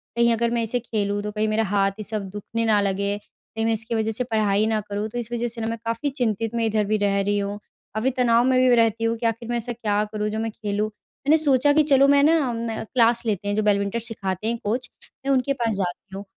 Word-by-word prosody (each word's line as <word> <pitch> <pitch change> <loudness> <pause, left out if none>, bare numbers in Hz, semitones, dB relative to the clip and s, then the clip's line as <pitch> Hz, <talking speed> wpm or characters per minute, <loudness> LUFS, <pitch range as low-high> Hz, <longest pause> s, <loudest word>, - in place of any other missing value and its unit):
कहीं 235 0 +4
अगर 235 +1 +1
मैं 235 -1 0
इसे 235 +2 -1
खेलूँ 205 -3 -2
तो 210 - -3
कहीं 215 +1 -1
मेरा 215 +1 +1
हाथ 195 -1 +1
ये - - -4
सब 205 -2 -3
दुखने 225 +3 -3
ना 215 -2 +4
लगे। 200 +1 -1
कहीं 225 +2 -7
मैं 225 - +2
इसकी 225 +1 -1
वज़ह 220 0 0
से 250 +3 -1
पढ़ाई 215 -3 +1
ना 220 -1 +1
करूँ 205 +1 -4
तो 245 - -6
इस 235 0 -6
वज़ह 240 0 -1
से 230 -1 -6
न 225 - -1
मैं 230 - -3
काफ़ी 230 +6 -1
चिंतित 230 -4 -2
मैं 230 -1 +1
इधर 215 -1 +1
भी 215 +2 +1
रह 200 -1 +1
रही 205 +1 0
हूँ। 200 +1 -3 0.4
काफ़ी 235 +5 +1
तनाव 235 -1 +4
में 260 -1 +3
भी 245 - +6
रहती 225 -1 +2
हूँ 230 0 +1
कि 235 - -4
आख़िर 230 +1 -1
मैं 240 - 0
ऐसा 240 +1 -4
क्या 210 -2 0
करूँ 210 0 -1
जो 220 +1 -3
मैं 225 0 -2
खेलूँ। 210 0 -2
मैंने 285 +8 -1
सोचा 285 -1 +3
कि 305 0 +4
चलो 275 -2 +5
मैं 280 0 +5
न 325 +2 +5
अम, 230 -4 -2
क्लास 235 0 +2
लेते 205 -3 -1
हैं 205 - 0
जो 215 - +1
बैडमिंटन 200 +2 +1
सिखाते 215 -3 -4
हैं 235 +1 0
कोच 235 +5 -2 0.4
मैं 275 - +1
उनके 270 +1 +2
पास 235 -4 -1
जाती 190 0 -4
हूँ 200 - -6
225 Hz, 260 wpm, -23 LUFS, 205-235 Hz, 0.4 s, भी